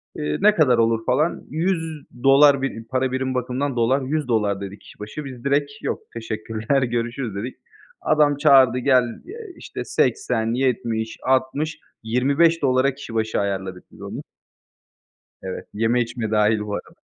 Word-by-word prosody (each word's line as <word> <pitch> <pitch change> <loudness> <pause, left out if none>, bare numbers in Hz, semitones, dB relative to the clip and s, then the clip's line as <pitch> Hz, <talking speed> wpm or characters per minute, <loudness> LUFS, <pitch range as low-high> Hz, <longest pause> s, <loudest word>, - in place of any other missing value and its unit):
İii, 75 0 -2
"Ne 210 0 +5
kadar 130 -7 +4
olur?" 115 0 +1
falan. 150 +7 +1
$100 150 -5 +2
bir 115 -4 -3
para 130 +1 0
birim 130 0 -1
bakımından 125 +2 -2
dolar, 125 +4 +2
$100 115 -8 0
dedi 100 +1 -7
kişi - - -17
başı. 105 +8 -7
Biz 130 -3 -9
direkt 140 +1 +1
"Yok, - - -2
teşekkürler 115 +3 -2
görüşürüz" 120 -2 -2
dedik. 120 +6 -5 0.5
Adam 150 -2 +3
çağırdı, 135 -4 +5
"Gel", 125 -1 +4 0.2
eee, 430 +3 -9
işte, - - -7
80-70-60 130 - 0 0.2
$25'a 135 +2 +2
kişi 135 -5 -9
başı 110 0 0
ayarladık 95 -2 -3
biz - - -16
onu. - - -6 1.2
Evet, 95 -1 -6
yeme 115 +3 +1
içme 115 -2 -3
dâhil 105 0 +3
bu 105 -1 -5
arada. - - -9
125 Hz, 135 wpm, -22 LUFS, 115-140 Hz, 1.2 s, Ne